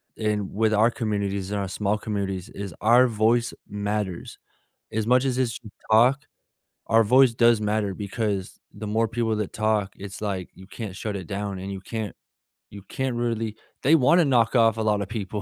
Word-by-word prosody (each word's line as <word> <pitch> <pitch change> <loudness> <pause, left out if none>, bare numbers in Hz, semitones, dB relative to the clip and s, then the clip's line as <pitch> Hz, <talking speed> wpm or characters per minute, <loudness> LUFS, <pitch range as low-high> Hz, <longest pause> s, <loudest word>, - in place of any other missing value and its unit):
in 105 -3 -2
with 110 +1 +2
our 115 +3 +4
communities, 100 -4 -2
and 105 -1 -2
our 100 - -2
small 105 +2 -1
communities, 100 -3 -4
is 100 -4 -7
our 120 +4 +6
voice 115 +2 +2 0.2
matters. 105 -3 -3 0.5
As 110 0 -2
much 125 +2 +4
as 125 -1 0
it's 125 -3 -1
you 105 - -11 0.2
talk, 125 +5 +5 0.7
our 115 0 +5
voice 125 +3 +5
does 115 -1 +4
matter, 105 -2 0
because 100 -1 -3
the 110 - -7
more 110 +2 +1
people 115 -2 -1
that 105 -2 -4
talk, 110 -2 0
it's 100 0 -8
like, 95 -4 -3
you 95 - -14
can't 100 0 -7
shut 105 0 -4
it 90 -3 -6
down, 100 -1 -4
and 95 +1 -6
you 95 - -6
can't 110 0 -5 0.6
you 100 -1 -9
can't 130 -2 -2
really 115 -2 -2 0.3
they 145 +5 +4
wanna 160 +4 +5
knock 120 -3 +2
off 115 -1 +4
a - - -1
lotta 105 -2 +1
people. 105 -1 -4
110 Hz, 185 wpm, -25 LUFS, 100-115 Hz, 0.7 s, our